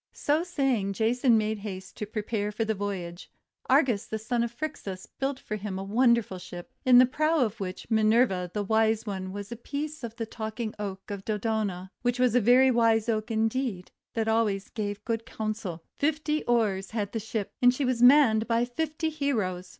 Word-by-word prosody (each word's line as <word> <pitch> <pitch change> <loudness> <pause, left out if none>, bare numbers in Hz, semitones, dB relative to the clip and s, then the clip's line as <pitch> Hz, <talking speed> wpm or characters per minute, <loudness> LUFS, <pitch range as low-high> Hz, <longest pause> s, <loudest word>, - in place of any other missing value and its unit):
So 295 +2 +1
saying 270 - 0
Jason 235 +3 +3
made 215 0 -1
haste 190 -2 -7
to 210 - -4
prepare 210 -1 -2
for 220 +2 -2
the 220 - 0
voyage. 190 -4 -5 0.4
Argus, 255 -6 +3
the 220 - -3
son 230 +2 -1
of 235 -1 -1
Phrixus, 235 -9 -6
built 270 0 -4
for 215 - -5
him 200 -2 -5
a 190 - -4
wonderful 230 -2 +2
ship, 180 +5 -9
in 255 -2 +7
the 250 - +9
prow 310 +5 +1
of 225 -3 0
which 185 -2 -5
Minerva 215 -4 +3
the 210 +1 -2
Wise 220 +1 +2
One 190 -3 -4
set 200 - -18
a 235 0 -7
piece 295 +1 -5
of 230 -1 -6
the 230 -2 -3
Talking 220 0 -5
Oak 195 -1 -6
of 200 -1 -5
Dodona; 210 -4 -2
which 245 0 0
was 250 -2 +3
a 250 - +4
very 255 +4 +6
wise 230 -2 +3
Oak 215 0 -1
indeed, 225 -3 -1 0.2
that 225 -1 0
gave 220 - +2
always 210 -3 0
good 215 +2 -3
counsel. 215 -6 -4 0.2
Fifty 305 +1 0
oars 210 -5 +1
had 210 -3 -3
the 225 - -2
Ship, 220 -1 -4
and 245 0 +7
she 265 +2 -2
was 250 -2 0
manned 245 -4 +6
by 230 0 +2
fifty 315 +5 -2
heroes. 210 -12 -2
220 Hz, 190 wpm, -27 LUFS, 205-245 Hz, 0.4 s, the